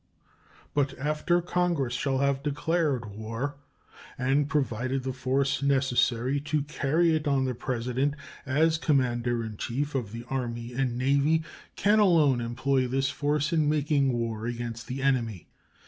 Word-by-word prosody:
But 145 -2 0
after 155 +5 0
Congress 175 -8 0
shall 135 +2 0
have 140 0 +1
declared 145 -3 0
war 115 +7 -4 0.6
and 135 +2 +1
provided 130 -2 -1
the 130 0 -3
force 135 +1 0
necessary 130 -1 +2
to 150 0 -1
carry 155 +3 +1
it 155 -1 -2
on 135 -2 +2
the 130 - -1
President, 125 +4 -1 0.3
as 155 +4 +2
Commander 120 -5 +1
in 110 -2 -7
Chief 140 +7 -2
of 120 -7 -2
the 115 +1 -7
Army 120 -2 -4
and 125 -1 -1
Navy, 140 +5 +2 0.3
can 210 +2 +3
alone 155 - +4
employ 130 +2 0
this 135 +2 0
force 150 +2 0
in 155 -2 +3
making 145 -2 +2
war 115 -2 -2
against 120 0 -5
the 135 +1 -4
enemy. 115 - 0
135 Hz, 145 wpm, -27 LUFS, 120-145 Hz, 0.6 s, alone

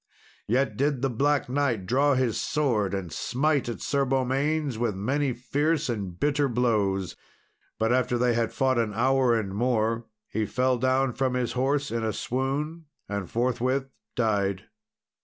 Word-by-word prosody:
Yet 130 +5 +1
did 140 -1 0
the 135 - +1
Black 140 +4 +1
Knight 125 -7 0
draw 135 +6 +3
his 125 -4 +1
sword, 110 -10 0
and 90 -4 -5
smite 140 +1 0
at 115 - -5
Sir 140 -1 +1
Beaumains 135 +2 0
with 115 -4 0
many 135 +8 0
fierce 145 +5 0
and 100 -7 -4
bitter 145 -1 +2
blows; 105 -6 0 0.6
but 110 +2 +2
after 125 -1 +1
they 120 0 +2
had 115 -1 0
fought 130 -2 +1
an 105 -3 -1
hour 130 0 +3
and 100 -3 -4
more, 115 0 0 0.2
he 110 0 -2
fell 130 0 +1
down 130 +1 +2
from 130 0 0
his 125 -2 0
horse 140 +3 0
in 115 -1 -1
a 110 -1 -1
swoon, 145 +6 -2 0.2
and 100 -3 -4
forthwith 130 +3 0 0.2
died. 100 -4 0
125 Hz, 160 wpm, -26 LUFS, 115-135 Hz, 0.6 s, draw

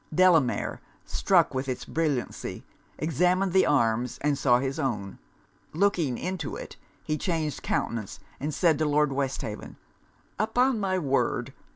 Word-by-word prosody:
Delamere, 165 -6 +3 0.2
struck - - +2
with 130 0 -2
its 125 - -3
brilliancy, 150 -6 -2 0.3
examined 180 +4 +1
the 190 - +5
arms 120 -3 +1
and 150 0 +2
saw 125 -3 +4
his 135 +4 -2
own: 105 -9 -3 0.5
looking 165 -8 +1
into 180 -5 -4
it, - - -8 0.3
he 155 -1 -2
changed 160 -6 -2
countenance, 115 -4 -2 0.2
and 150 +2 -2
said 155 0 +2
to 155 - +2
Lord 150 -1 +2
Westhaven 135 -6 -4 0.6
'Upon 240 +3 +2
my 190 -2 0
word! 140 -6 0
150 Hz, 135 wpm, -27 LUFS, 130-180 Hz, 0.6 s, the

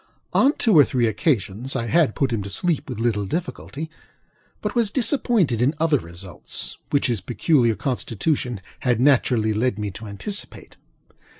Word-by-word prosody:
On 275 - +5
two 225 - +3
or 150 - +9
three 125 -3 +1
occasions 110 - 0
I 115 - -1
had 155 -1 +2
put 135 -4 0
him 110 - -1
to 100 - -6
sleep 160 - -1
with - - -5
little 110 -4 0
difficulty, 160 - -4 0.7
but - - -3
was 235 -4 +2
disappointed 225 - +2
in 140 +5 +2
other 155 -3 +3
results 85 -2 -6
which 140 - +1
his 120 -7 0
peculiar 120 - +2
constitution 125 - -2 0.2
had 125 -3 +1
naturally 125 -5 +3
led 115 0 0
me 105 -1 -3
to 110 +3 -9
anticipate. 195 - -4
125 Hz, 160 wpm, -23 LUFS, 110-155 Hz, 0.7 s, or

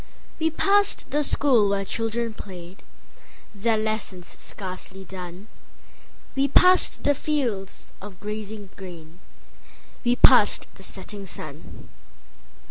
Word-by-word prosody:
We 320 0 +2
passed 400 +5 +2
the 295 +1 +2
school 250 -8 +4
where 200 0 0
children 225 +2 -2
played, 185 -3 -10 0.7
Their 220 +2 +1
lessons 215 -4 -2
scarcely 190 0 -6
done; 185 +1 -8 0.9
We 275 +1 +3
passed 365 +6 +5
the 290 - +4
fields 245 -10 -2
of 195 -2 -10
gazing 210 -1 -6
grain, 175 -3 -11 0.8
We 245 0 +3
passed - - +6
the - - -14
setting 200 -2 -7
sun. 155 -3 -8
210 Hz, 110 wpm, -25 LUFS, 190-240 Hz, 0.9 s, passed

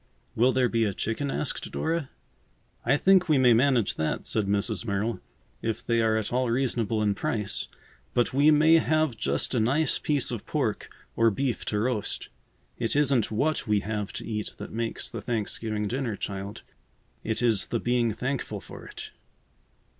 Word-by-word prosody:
"Will 125 +3 +4
there 130 -1 +2
be 115 -1 +1
a 100 -3 -2
chicken?" 125 +6 -2
asked 140 - -2
Dora. 160 -4 -1 0.7
"I 135 +5 +3
think 185 +1 +4
we 150 - +5
may 125 -2 +6
manage 125 -1 +2
that," 80 - -1
said 105 -3 0
Mrs. 100 0 0
Merrill, 105 +1 -1 0.4
"if 110 -1 -3
they 115 -1 +2
are 110 -1 +2
at 110 +1 -2
all 125 -1 +1
reasonable 115 -3 0
in 105 -1 +2
price, 105 0 -2 0.5
but 120 0 +2
we 140 +3 +5
may 155 +2 +6
have 155 -5 +1
just - - 0
a 125 - +2
nice 135 +6 +2
piece 145 -5 0
of 120 -4 -5
pork - - -1 0.3
or 115 0 +4
beef 125 +2 -2
to 105 - -1
roast. 110 -1 -1 0.5
It 115 - -1
isn't 140 -6 +3
what 140 +6 0
we 105 -1 +2
have 105 -1 -3
to - - -6
eat 105 -2 -4
that - - -8
makes 115 0 -2
the 115 - -6
Thanksgiving 110 -1 -2
dinner, 125 -1 -2
child. 100 +2 -5 0.6
It 110 +2 -1
is 110 -5 +3
the 115 - -1
being 120 -1 +1
thankful 130 +5 -3
for - - -11
it." - - -9
115 Hz, 175 wpm, -27 LUFS, 110-135 Hz, 0.7 s, may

